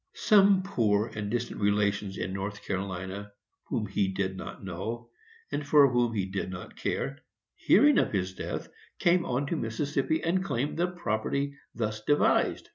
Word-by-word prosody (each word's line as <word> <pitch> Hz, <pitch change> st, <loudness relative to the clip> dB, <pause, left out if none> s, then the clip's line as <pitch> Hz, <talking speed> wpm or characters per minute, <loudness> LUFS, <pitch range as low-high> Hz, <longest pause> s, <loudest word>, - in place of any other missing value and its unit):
Some 200 Hz, -3 st, +5 dB
poor 110 Hz, -, +1 dB
and 105 Hz, -1 st, -4 dB
distant 120 Hz, 0 st, -3 dB
relations 100 Hz, -1 st, +1 dB
in 95 Hz, -, -3 dB
North 100 Hz, +2 st, -4 dB
Carolina, 95 Hz, +1 st, -4 dB, 0.3 s
whom 120 Hz, -6 st, -2 dB
he 100 Hz, 0 st, 0 dB
did 95 Hz, 0 st, -2 dB
not 95 Hz, -, -8 dB
know, 110 Hz, +6 st, -5 dB, 0.4 s
and 145 Hz, -, -2 dB
for 145 Hz, 0 st, +6 dB
whom 120 Hz, -2 st, +1 dB
he 100 Hz, -3 st, 0 dB
did 95 Hz, 0 st, -3 dB
not 90 Hz, -1 st, -8 dB
care, 135 Hz, +1 st, -2 dB, 0.3 s
hearing 290 Hz, -1 st, +5 dB
of -, -, +1 dB
his 95 Hz, -2 st, -1 dB
death, -, -, -5 dB, 0.3 s
came 175 Hz, 0 st, +3 dB
on 130 Hz, +3 st, 0 dB
to 155 Hz, -, -2 dB
Mississippi, 140 Hz, +5 st, -1 dB
and 185 Hz, +3 st, +1 dB
claimed 145 Hz, -5 st, -2 dB
the 175 Hz, +1 st, +2 dB
property 140 Hz, -3 st, -2 dB, 0.2 s
thus 110 Hz, -2 st, -2 dB
devised. 145 Hz, +6 st, +2 dB
110 Hz, 160 wpm, -29 LUFS, 100-145 Hz, 0.4 s, for